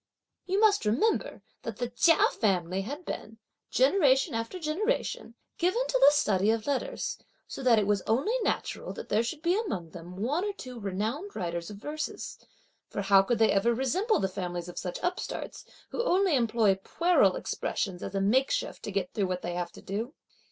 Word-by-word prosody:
You 385 +2 +1
must 425 -2 +4
remember 260 - +1 0.2
that 225 -3 -6
the 245 - -1
Chia 325 +7 +4
family 185 -3 0
had 285 - -6
been, 220 +1 -6 0.3
generation 270 -2 +3
after 230 +10 -3
generation, 325 - -2 0.2
given 370 +9 +2
to - - +1
the - - +9
study 210 -8 +2
of 225 -1 +1
letters, 285 - -2 0.3
so - - -7
that 250 -3 +5
it 210 - +3
was 205 -1 +1
only 270 - +1
natural - - -2
that - - -8
there 215 - +3
should 295 +7 -4
be 345 +2 +3
among 200 - -3
them 175 0 -10
one 275 - 0
or 410 -1 -2
two 255 -10 -9
renowned 220 - -3
writers 170 -3 -3
of 205 - -8
verses; 300 +8 -5 0.5
for 200 - -3
how 195 0 +6
could 230 +5 0
they 220 -1 +4
ever 230 +4 +2
resemble 365 - +1
the 190 - +1
families 180 -2 -4
of 175 - -6
such 180 -2 -4
upstarts, 360 +1 -4 0.2
who 475 - -2
only 380 -7 +3
employ 230 -4 +3
puerile 350 +7 +3
expressions 195 - -3
as 195 - -5
a 195 - +1
makeshift 260 - +1
to 210 - -5
get 195 -2 -2
through 200 -3 0
what 180 0 -3
they 175 - -3
have 175 -1 -3
to - - -13
do? 225 - -4
230 Hz, 185 wpm, -29 LUFS, -, 0.5 s, the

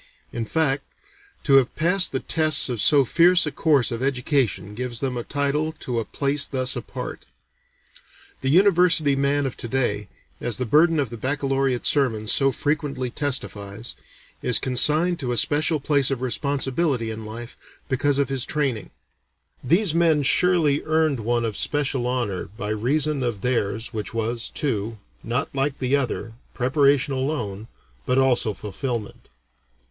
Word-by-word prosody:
In 115 - -3
fact, 145 -1 0 0.6
to 140 -2 +5
have 130 -2 +2
passed 180 +4 +2
the 130 - -1
tests 155 -3 +1
of 120 -4 -2
so 145 -3 +5
fierce 175 +6 +4
a 150 - -3
course 140 -4 +2
of 115 0 -4
education 125 - 0
gives 120 +1 -4
them 130 -2 -2
a 120 - -3
title 145 +4 -1
to 125 -6 -4
a 115 - -3
place 140 +4 0
thus 130 -1 0
apart. 120 - -7 1.1
The 135 - -1
university 170 -4 +4
man 140 +1 +1
of 130 - -3
to - - -5
day, 110 -5 -1 0.3
as 120 -3 -1
the 125 - -2
burden 155 +6 +4
of 135 -6 -1
the 120 - -6
baccalaureate 135 0 -1
sermons 115 -7 +1
so 135 -1 +3
frequently 140 -2 -2
testifies, 115 -6 -2 0.5
is - - +4
consigned 155 +7 +2
to 130 -4 -2
a - - -2
special 155 +6 +2
place 140 -1 +2
of 130 -2 -3
responsibility 135 -1 -1
in 110 0 -7
life 115 +2 -8 0.3
because 140 +1 +1
of 140 -1 +1
his 135 -2 0
training; 135 -8 -2 0.7
these 170 - +2
men 165 -3 +3
surely 160 -1 +3
earned 155 -4 +1
one 120 +1 0
of 110 -2 -3
special 135 -4 -1
honor 120 -7 -2
by 105 - -4
reason 140 +7 0
of 120 -6 -2
theirs, 115 -2 -1
which 110 +1 -5
was, 115 +1 -2
too, 115 -5 -2 0.2
not 120 +4 -3
like 135 0 -1
the 130 +1 +1
other, 125 -4 -2 0.2
preparation 140 +2 +2
alone, 120 -7 -3 0.4
but 125 - +1
also 125 -5 +2
fulfilment. 110 +2 -5
135 Hz, 155 wpm, -23 LUFS, 120-145 Hz, 1.1 s, to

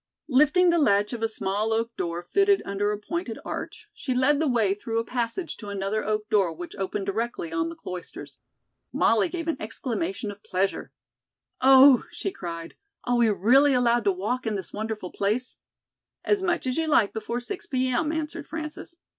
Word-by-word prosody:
Lifting 300 +6 +5
the 340 - +3
latch 205 -5 +3
of 235 - -5
a 225 - +2
small 210 +1 -1
oak 230 +1 -1
door 170 0 -3
fitted 395 - +3
under 205 +1 -1
a 210 - -2
pointed 340 - -4
arch, 430 - -6
she 260 -3 -3
led 275 +3 +3
the 320 - +1
way 225 -7 +2
through 225 +3 -4
a 230 - +1
passage 245 +9 -3
to 210 - -10
another 200 +2 -2
oak 215 0 -1
door 195 -6 +2
which 175 +1 -8
opened 195 0 -3
directly 205 -4 -3
on 165 0 0
the 165 - -8
Cloisters. 180 +1 -8 0.5
Molly 220 -3 +3
gave 335 -2 -5
an 325 - 0
exclamation 240 - -3
of 205 0 -13
pleasure. 190 0 -2 0.7
"Oh," 265 0 +7
she 390 - -4
cried, 165 - -7 0.3
"are 245 0 +1
we 235 -2 +4
really 255 +8 +4
allowed 240 -2 +2
to 200 - +4
walk 215 +7 -2
in 215 - 0
this 195 - -6
wonderful 215 -3 -4
place?" 215 +6 -2 0.7
"As 415 -2 +2
much 350 -6 0
as 255 -1 -1
you 325 -1 0
like 230 -9 +3
before 235 +2 -3
six 375 +11 -6
P. 260 -1 0
M.," 300 +5 0
answered 320 +1 -4
Frances. 315 +1 -7
230 Hz, 190 wpm, -26 LUFS, 205-285 Hz, 0.7 s, Oh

